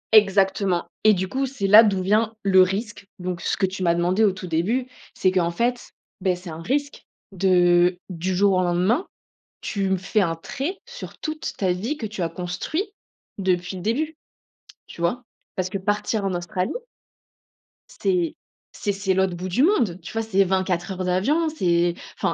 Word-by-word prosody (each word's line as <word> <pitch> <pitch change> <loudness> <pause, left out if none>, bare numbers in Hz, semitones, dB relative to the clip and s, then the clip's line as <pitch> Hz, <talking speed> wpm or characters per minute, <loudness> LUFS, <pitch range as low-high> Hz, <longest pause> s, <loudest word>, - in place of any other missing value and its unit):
Exactement, 195 -3 +4 0.2
et 215 -1 +6
du 190 +1 -2
coup, 270 +6 -1
c'est 250 -6 -4
là 210 +3 +9
d'où 195 -4 +1
vient 220 +3 +2
le 190 -1 +6
risque, 195 +2 -1
donc 180 -1 -4
ce - - -1
que 195 - +2
tu 190 0 -5
m'as 170 -1 +3
demandé 180 +5 +2
au 205 - +5
tout 185 0 -8
début, 185 +10 0 0.3
c'est 185 - +2
qu'en 175 -2 +2
fait, 240 +7 -1 0.3
bah, 185 -1 +2
c'est 180 -1 -9
un 160 +1 -7
risque 285 +8 -2 0.2
de 180 -1 +4
du 180 +1 -2
jour 200 +1 +4
au 185 - +3
lendemain, 180 - +1 0.5
tu 195 -2 -2
me 190 - +2
fais 195 +3 0
un 165 -2 0
trait 280 - -4
sur 485 +1 -9
toute 310 0 -4
ta 190 -2 0
vie 220 +12 -3
que 230 -7 -4
tu 205 -3 -5
as 165 - 0
construit, 180 - -3 0.6
depuis 185 -1 0
le 180 - -7
début, 300 - -1 0.7
tu - - -13
vois? 205 +9 0 0.3
Parce 185 -1 -1
que 195 - -2
partir 205 +1 -1
en 195 - 0
Australie 180 +2 -2 1.3
c'est 350 -4 +1 0.4
c'est 205 - -2
c'est 195 -1 0
l'autre 190 -1 +1
bout 185 +2 -5
du 240 +9 +1
monde 235 - +2
tu 165 - -9
vois 225 0 -1
c'est 195 -3 +3
24 185 -1 0
heures 185 0 -3
d'avion, 280 - +2
c'est 175 - +1 0.3
enfin, - - +1
190 Hz, 185 wpm, -23 LUFS, 180-220 Hz, 1.3 s, là